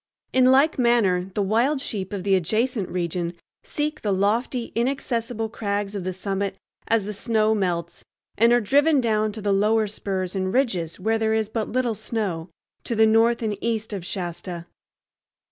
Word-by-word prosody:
In 255 0 +5
like 275 +3 +4
manner 200 -7 +2
the 205 - +1
wild 235 +9 +2
sheep 195 -8 -4
of 200 -3 -4
the 195 0 +2
adjacent 215 - 0
region 175 -1 -2 0.3
seek 300 0 -3
the 210 - -1
lofty 225 +5 0
inaccessible 235 -2 -1
crags 205 -2 -3
of 200 -3 -4
the 185 - -2
summit 195 +1 -3 0.3
as 225 -3 +2
the 210 - -4
snow 215 +1 +1
melts, 180 -5 -2 0.3
and 230 +2 +4
are 240 0 +4
driven 285 +7 +3
down 215 -3 +1
to 215 -1 -8
the 205 -1 +2
lower 215 +2 +3
spurs 195 -2 -3
and 185 -1 -1
ridges 190 - 0
where 220 +4 +1
there 220 0 +1
is 220 -1 0
but 220 -1 -2
little 245 -1 0
snow, 205 -6 -3 0.3
to 235 - -2
the 220 0 +5
north 230 +2 +3
and 215 -2 -1
east 225 -2 -2
of 195 -4 -4
Shasta. 175 -1 -5
215 Hz, 175 wpm, -24 LUFS, 190-235 Hz, 0.3 s, In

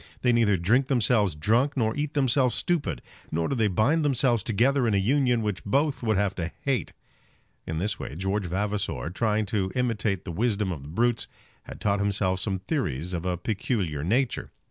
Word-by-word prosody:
They 125 -1 +4
neither 110 -4 +3
drink 115 +10 +2
themselves 110 - +2
drunk, 120 - +1
nor 110 -2 +1
eat 145 0 -3
themselves 130 -3 +2
stupid; 120 - -1 0.3
nor 80 +1 0
do - - -1
they 115 -5 +2
bind 115 - +2
themselves 125 -5 +2
together 120 +5 +2
in 105 - +2
a - - +3
union 125 +2 +2
which 105 -3 -2
both 140 +7 +1
would 110 -4 +1
have 100 -1 +1
to 85 -1 -3
hate." 135 -3 -1 0.7
In 80 - -3
this 100 +6 -2
way - - -6
George 95 +2 -1
Vavasor, 100 -2 -2
trying 110 +2 0
to 95 -2 -1
imitate 115 -6 0
the 90 - -4
wisdom 105 0 0
of 80 -6 -5
the 70 - -10
brutes, 115 +7 +1 0.4
had - - -9
taught 100 -1 +1
himself 100 -2 0
some 95 0 -1
theories 90 - -2
of 85 +1 -3
a 90 -1 0
peculiar 95 - -2
nature. 115 - 0
105 Hz, 190 wpm, -26 LUFS, 95-125 Hz, 0.7 s, They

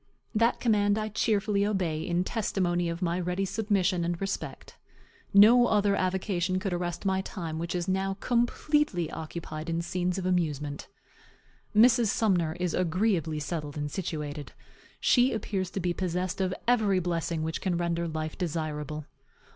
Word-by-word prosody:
That 230 +2 +2
command 205 -3 +2
I 215 0 -2
cheerfully 210 -1 +1
obey, 185 -7 0
in 175 +2 0
testimony 180 -5 0
of 170 +2 -4
my 175 +1 0
ready 180 +2 -1
submission 195 -3 +1
and 170 0 -2
respect. 195 0 -5 0.6
No 230 +5 +7
other 205 -2 +3
avocation 185 -1 0
could 190 -1 -2
arrest 175 +1 -3
my 190 -1 +2
time, 165 -5 -5
which 170 +1 -3
is 175 -1 -2
now 190 +1 0
completely 240 - +1
occupied 160 0 -6
in 165 0 -1
scenes 180 +1 -1
of 190 - -3
amusement. 150 -5 -1 0.9
Mrs. 235 +1 +6
Sumner 180 -7 +1
is 180 -2 -1
agreeably 175 -3 +1
settled 150 -1 -4
and 145 0 -3
situated. 150 -5 -4 0.5
She 250 +1 +4
appears 195 -4 -2
to 195 - -4
be 175 -1 0
possessed 180 +1 -2
of 185 -1 +1 0.2
every 215 -6 +3
blessing 170 -2 -1
which 160 +1 -3
can 180 -3 0
render 170 0 -1
life 155 -1 -4
desirable. 155 -3 -3
180 Hz, 150 wpm, -28 LUFS, 165-200 Hz, 0.9 s, No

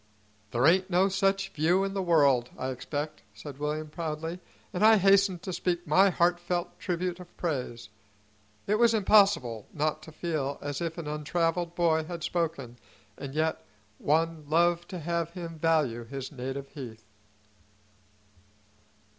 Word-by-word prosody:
"There 120 +4 +1
ain't 185 +4 +4
no 190 +2 +3
such 195 0 +1
view 175 +3 +2
in 195 0 -2
the 195 - -1
world, 140 -9 +3
I 130 - -3
expect," 145 +4 -4
said 135 +6 -9
William 150 +1 -2
proudly, 160 +1 -4 0.3
and 180 - -1
I 220 0 +8
hastened 195 -2 +4
to 185 - -4
speak 175 0 -1
my 185 +6 +5
heartfelt 175 0 0
tribute 180 -1 -2
of 180 -1 -13
praise; 125 - -3 0.8
it 210 +2 +1
was 235 -1 +5
impossible 195 - +3
not 155 0 -1
to 160 - -11
feel 155 -4 -2
as 145 +1 -4
if 165 0 -3
an 170 - -5
untraveled 165 +3 -1
boy 160 -2 +2
had 170 -1 -6
spoken, 140 -10 -2 0.4
and 140 0 -8
yet 160 +1 0 0.4
one 160 +1 +1
loved 170 +2 +2
to 185 - -5
have 170 0 -2
him 165 -3 -7
value 150 -8 +1
his 135 +2 -7
native 135 +1 -5
heath. 115 -6 -9
165 Hz, 145 wpm, -28 LUFS, 145-180 Hz, 0.8 s, I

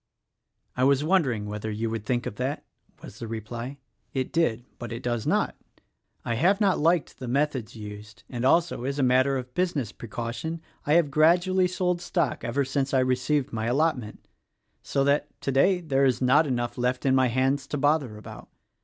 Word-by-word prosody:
"I 130 - 0
was 140 +1 +4
wondering 150 - +1
whether 105 +1 -4
you 110 +2 -2
would 110 -2 -5
think 120 -1 0
of 105 - -5
that," 130 +3 -3 0.4
was - - -11
the 115 - -5
reply. 115 +4 -6 0.4
"It 130 +4 -2
did 120 -9 +1
— - - -38
but 120 - -6
it 115 +2 -6
does 120 -2 -2
not. - - +1 0.7
I 120 - 0
have 180 - +3
not 200 -4 +3
liked 165 -1 +1
the 130 - -6
methods 130 -4 -1
used, 105 +1 -10
and 120 -2 -5
also 165 -1 +2
as 140 +2 -2
a 140 - +1
matter 130 +2 +3
of 125 -1 -7
business 165 - -1
precau 115 +1 -5
tion 160 +8 -4 0.3
I 150 - +3
have 165 -4 +4
gradually 175 +5 +4
sold 180 -1 -1
stock 170 -8 -1
ever 125 +4 0
since 135 +1 -1
I - - +5
received 130 +2 0
my 110 0 -2
allotment 125 -4 -1 0.3
— - - -53 0.2
so 135 - 0
that, 140 +1 0
today, 160 +8 +2
there 140 -4 +2
is 130 -2 +2
not 140 +5 +4
enough 120 -1 -2
left 125 +1 0
in 135 - +4
my 130 -1 +4
hands 135 +3 0
to 145 - -3
bother 145 -6 +1
about. 105 - -11
130 Hz, 195 wpm, -26 LUFS, 120-150 Hz, 0.7 s, I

